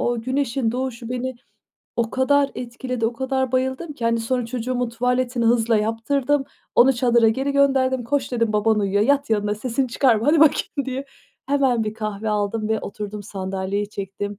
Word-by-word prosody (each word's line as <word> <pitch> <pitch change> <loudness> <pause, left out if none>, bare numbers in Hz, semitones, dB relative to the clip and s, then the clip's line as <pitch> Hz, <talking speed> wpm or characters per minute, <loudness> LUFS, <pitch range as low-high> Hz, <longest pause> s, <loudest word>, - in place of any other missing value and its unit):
O 240 -1 0
güneşin 255 -2 -1
doğuşu 250 -2 -4
beni 255 +1 -3 0.6
o 230 -1 0
kadar 280 +2 +2
etkiledi, 245 -1 -3
o 235 - -1
kadar 265 +1 -1
bayıldım 260 +5 -1
ki, 245 -5 -7
hani, 230 0 +2
sonra 245 +1 -1
çocuğumun 250 +1 -2
tuvaletini 250 0 0
hızla 230 -1 +3
yaptırdım, 255 +6 0 0.3
onu 265 +3 +6
çadıra 235 -2 +3
geri 270 +5 0
gönderdim, 265 -3 +2
"Koş" 270 0 -1
dedim, 230 -3 +1
"Baban 210 +1 +2
uyuyor, 200 +1 +1
yat 280 +1 +2
yanına, 210 -1 +1
sesini 250 +4 -2
çıkarma, 235 -2 +2
hadi 305 +1 +4
bakayım" 290 -2 +3
diye. 265 +1 -3 0.4
Hemen 265 -5 +2
bir 215 - -4
kahve 215 0 -4
aldım 210 +1 -1
ve 220 - 0
oturdum, 210 0 -6
sandalyeyi 195 +1 -3
çektim. 200 0 -5
240 Hz, 165 wpm, -22 LUFS, 220-260 Hz, 0.6 s, onu